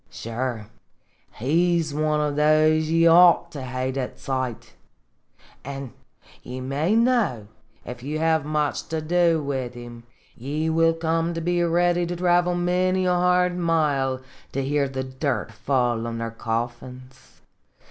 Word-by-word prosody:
Sure, 115 -1 -4 0.7
he 170 +8 +2
's 155 -3 -3
one 155 0 0
of 150 -1 -1
those 155 +1 +3
ye 165 +1 +3
ought 170 0 +6
to 145 - -7
hate 130 +1 -3
at 130 -2 -4
sight; 130 -3 -4 0.9
an' 135 -2 -7 0.5
ye 125 +1 -7
may 140 +10 0
know, 230 - +1 0.4
if 125 0 -8
ye 145 +4 -4
have 160 -1 +1
much 150 -1 -2
to 160 -1 -2
do 165 0 +2
wid 130 -3 -4
'em, 120 -1 -10 0.3
ye 150 +6 -2
will 165 0 +3
come 165 +1 -1
to - - -2
be 175 +1 0
ready 175 +1 +2
to 175 - -3
travel 175 0 +2
many 185 +1 +1
a 180 - +2
hard 180 0 +2
mile 150 -6 0 0.3
to 135 - -2
hear 140 0 0
the 130 0 -4
dirt 130 -2 -3
fall 120 -1 -1
on 115 0 -4
their 115 0 -4
coffins. 120 +3 -6
150 Hz, 145 wpm, -24 LUFS, 130-170 Hz, 0.9 s, ought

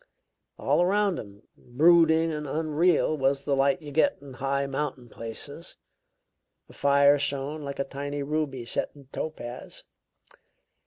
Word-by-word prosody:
All - - +2
around 195 0 +2
him, 100 0 -11
brooding 160 +4 +4
and 150 -1 -4
unreal, 155 +2 +2
was 135 -1 0
the 140 -1 +1
light 135 +2 +2
you 145 - -8
get 160 - +2
in 140 -2 -11
high 140 +2 -1
mountain 135 -3 -4
places. 115 +9 -6 0.9
The - - -16
fire 140 0 +4
shone 140 +2 -2
like 140 -1 -6
a 140 - 0
tiny 140 +1 -5
ruby 140 -4 -2
set - - -1
in 140 -2 -16
topaz. 125 -6 -6
140 Hz, 140 wpm, -27 LUFS, 135-155 Hz, 0.9 s, brooding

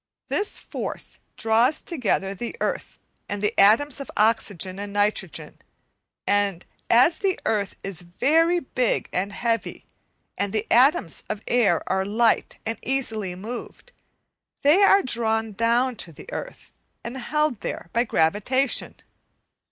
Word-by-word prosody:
This 410 - 0
force - - -5 0.2
draws 230 +6 +3
together 215 - -1
the 235 +5 -6
earth - - -3 0.3
and 205 - -3
the 210 +2 +1
atoms 230 +9 +5
of 275 - -7
oxygen 200 -4 +1
and 205 0 -5
nitrogen; 205 +1 -1 0.7
and 200 -3 +1 0.2
as 250 +8 +5
the 385 -2 0
earth 205 -3 0
is 195 -3 -5
very 320 - +2
big 250 -2 -1
and 195 +3 -1
heavy, 230 +2 -2 0.5
and 200 -1 -1
the 215 0 0
atoms 245 - +4
of 210 - -4
air 220 -9 +3
are 190 0 0
light 220 +4 +1
and 225 +1 -3
easily 220 -8 -2
moved, 235 - -8 0.7
they 300 +8 +5
are 395 0 +6
drawn 225 -2 0
down 235 +4 +1
to 170 - -4
the 150 - -13
earth - - -7 0.3
and 235 +2 -6
held 295 -1 0
there 165 - -5
by 235 - +3
gravitation. 220 +8 +1
225 Hz, 135 wpm, -24 LUFS, 200-260 Hz, 0.7 s, are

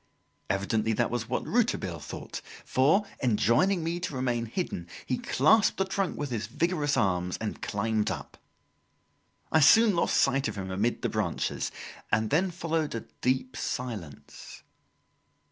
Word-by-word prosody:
Evidently 105 +3 0
that - - 0
was 120 -1 -3
what 125 - -1
Rouletabille 205 - 0
thought, 75 - -7 0.2
for, 155 +11 +3 0.2
enjoining 125 - +3
me 170 +2 -2
to 170 -5 -4
remain 120 -2 -1
hidden, 110 - -4 0.2
he 125 - -1
clasped 155 - +3
the 195 - +1
trunk 190 -1 -2
with 145 -2 -3
his 110 -3 -2
vigorous 150 - 0
arms 90 -4 +1
and 110 -1 -5
climbed 105 +1 0
up. - - -6 1.2
I 160 - +5
soon 210 +8 +6
lost 170 - +2
sight 135 0 +3
of 105 - -5
him 95 -1 -4
amid 105 +6 -1
the - - +1
branches, 105 -6 -2 0.4
and 110 +1 +1
then 180 +6 +3
followed 165 -5 -2
a 115 - -3 0.2
deep 130 0 0
silence. 110 - -6
125 Hz, 145 wpm, -28 LUFS, 105-165 Hz, 1.2 s, soon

